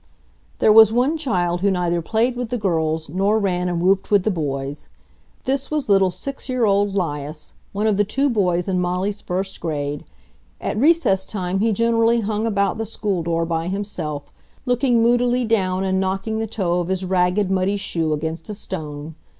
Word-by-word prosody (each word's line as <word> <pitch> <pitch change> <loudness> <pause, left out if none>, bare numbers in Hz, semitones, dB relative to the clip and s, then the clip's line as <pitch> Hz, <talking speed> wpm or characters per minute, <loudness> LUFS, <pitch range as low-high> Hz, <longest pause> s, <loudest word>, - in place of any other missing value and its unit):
There 215 - +5
was 220 -1 +8
one 250 +7 +2
child 180 - -1
who 200 - +3
neither 175 -2 0
played 225 +8 0
with 245 -2 -4
the 245 - -1
girls 160 -6 -1
nor 195 +7 +1
ran 180 -4 0
and 175 -1 -1
whooped 190 +2 +2
with 205 -3 +4
the 215 - +1
boys. 140 -4 -4 0.6
This 275 +1 -1
was 300 -6 -2
little 195 -2 +5
six 275 +10 -7
year 255 -2 +1
old 200 -1 +2
'Lias, 150 -4 -4 0.2
one 205 +2 -2
of 215 -3 +2
the 205 - +4
two 270 +8 0
boys 180 -8 +1
in 185 -2 0
Molly's 180 +3 -1
first 190 +2 -3
grade. 145 -3 -3 0.6
At - - -3
recess 260 - +3
time 190 -2 -3
he 225 +2 +2
generally 230 +2 +2
hung 215 +1 -1
about 200 0 0
the 225 - -1
school 200 -4 -2
door 165 0 0
by 165 0 -2
himself, 180 -7 -4 0.3
looking 245 -2 +2
moodily 245 +1 +2
down 190 -4 +1
and 190 0 +1
knocking 195 +3 -1
the 225 - -2
toe 180 -5 -1
of 175 - -2
his 190 0 -1
ragged, 185 +2 +1
muddy 190 +2 +1
shoe 165 -5 -2
against 160 +3 -3
a 210 - -4
stone. 155 -5 -6
195 Hz, 185 wpm, -21 LUFS, 175-220 Hz, 0.6 s, was